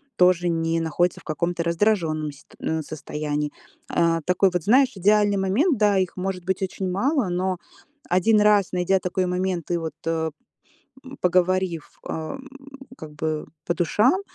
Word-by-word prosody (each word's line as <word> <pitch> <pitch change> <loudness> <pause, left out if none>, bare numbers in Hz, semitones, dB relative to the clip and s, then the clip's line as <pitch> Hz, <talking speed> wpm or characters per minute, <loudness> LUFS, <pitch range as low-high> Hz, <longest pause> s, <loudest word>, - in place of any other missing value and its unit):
тоже 180 -2 +4
не 165 0 0
находится 165 +2 0
в - - -23
каком-то 170 +2 -2
раздражённом 170 -4 +1
ст 145 +1 -18
м, 160 0 -2
состоянии. 150 -1 -3 0.4
А 165 0 +2
такой 180 +1 +3
вот, 180 -2 -1
знаешь, 260 - +4
идеальный 205 +1 +3
момент. 235 - +2
Да, 205 -2 +4
их 185 -1 0
может 185 -1 -3
быть 190 +1 -1
очень 190 0 -3
мало, 245 - +1
но 185 +1 -1 0.5
1 210 +5 +4
раз, 210 -2 +4
найдя 180 +1 +2
такой 185 0 -1
момент 180 -2 -2
и 175 - +2
вот, 165 -1 -5
э, 160 -1 -1 0.9
поговорив, 180 -2 +1 0.2
а, 160 +12 -4 0.6
как 155 -8 -9
бы, 155 0 -2 0.2
по 175 - +1
душам, 215 - +2
180 Hz, 150 wpm, -24 LUFS, 165-195 Hz, 0.9 s, тоже